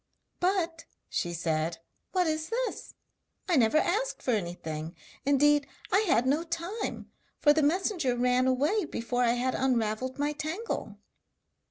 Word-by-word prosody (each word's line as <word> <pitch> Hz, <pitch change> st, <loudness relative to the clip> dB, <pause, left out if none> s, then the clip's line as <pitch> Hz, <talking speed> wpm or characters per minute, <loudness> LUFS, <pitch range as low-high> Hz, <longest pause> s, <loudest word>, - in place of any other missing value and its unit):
'But,' 350 Hz, -3 st, 0 dB, 0.2 s
she 175 Hz, -, -1 dB
said, 165 Hz, -1 st, -1 dB, 0.3 s
'what 365 Hz, -1 st, +2 dB
is 315 Hz, 0 st, -1 dB
this? 485 Hz, +2 st, -3 dB, 0.5 s
I 355 Hz, -, +3 dB
never 240 Hz, +1 st, +4 dB
asked 425 Hz, +11 st, 0 dB
for 255 Hz, -, +1 dB
anything! 170 Hz, -5 st, -3 dB, 0.3 s
Indeed 285 Hz, +1 st, +4 dB, 0.2 s
I 385 Hz, -, +5 dB
had 245 Hz, -6 st, +3 dB
no 285 Hz, +5 st, +2 dB
time, 345 Hz, +6 st, -4 dB, 0.3 s
for 295 Hz, -, +6 dB
the 310 Hz, -, +2 dB
messenger 320 Hz, -, +1 dB
ran 250 Hz, +1 st, +3 dB
away 295 Hz, +11 st, +2 dB
before 245 Hz, -3 st, -2 dB
I 235 Hz, -1 st, +4 dB
had 250 Hz, +1 st, 0 dB
unravelled 255 Hz, -1 st, 0 dB
my 290 Hz, +1 st, 0 dB
tangle.' 315 Hz, +9 st, -4 dB
285 Hz, 140 wpm, -29 LUFS, 240-340 Hz, 0.5 s, for